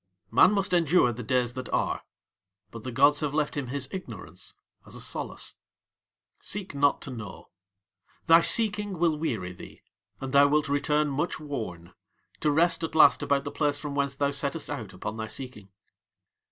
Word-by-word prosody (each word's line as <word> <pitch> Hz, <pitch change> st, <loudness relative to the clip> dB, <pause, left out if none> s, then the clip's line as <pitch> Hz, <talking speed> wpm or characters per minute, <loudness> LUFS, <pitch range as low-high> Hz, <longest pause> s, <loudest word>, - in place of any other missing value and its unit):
Man 185 Hz, -, +6 dB
must 195 Hz, -2 st, -1 dB
endure 165 Hz, -7 st, +3 dB
the 120 Hz, -, -7 dB
Days 120 Hz, +1 st, 0 dB
that 130 Hz, -1 st, -7 dB
Are, -, -, -1 dB, 0.7 s
but 115 Hz, -2 st, -10 dB
the 130 Hz, -, -5 dB
gods 140 Hz, +4 st, +4 dB
have 150 Hz, -1 st, -2 dB
left 150 Hz, -1 st, 0 dB
him 140 Hz, -3 st, -3 dB
his 140 Hz, +2 st, -3 dB
ignorance 190 Hz, -1 st, -9 dB, 0.3 s
as -, -, -11 dB
a -, -, -7 dB
solace. -, -, -5 dB, 0.8 s
Seek 200 Hz, -6 st, -4 dB
not 140 Hz, 0 st, +1 dB
to 135 Hz, -, -7 dB
know. 115 Hz, -5 st, -9 dB, 0.8 s
Thy 165 Hz, 0 st, +7 dB
seeking 210 Hz, -2 st, +5 dB
will 165 Hz, -1 st, +2 dB
weary 110 Hz, -, -3 dB
thee, -, -, -13 dB, 0.4 s
and 135 Hz, 0 st, -6 dB
thou 140 Hz, 0 st, +6 dB
wilt 150 Hz, +1 st, +1 dB
return 150 Hz, +1 st, +1 dB
much 150 Hz, +6 st, -2 dB
worn, 110 Hz, -, -6 dB, 0.5 s
to 150 Hz, -, +1 dB
rest 165 Hz, +3 st, +2 dB
at 160 Hz, -, -4 dB
last 150 Hz, -3 st, +6 dB
about 140 Hz, -1 st, 0 dB
the 145 Hz, -, -5 dB
place 145 Hz, -2 st, 0 dB
from 145 Hz, -1 st, -6 dB
whence 140 Hz, -1 st, -1 dB
thou 140 Hz, 0 st, 0 dB
settest 140 Hz, +2 st, -2 dB
out 115 Hz, -9 st, -6 dB
upon 100 Hz, +4 st, -6 dB
thy 110 Hz, 0 st, -4 dB
seeking. 110 Hz, -4 st, -7 dB
140 Hz, 175 wpm, -27 LUFS, 125-155 Hz, 0.8 s, Thy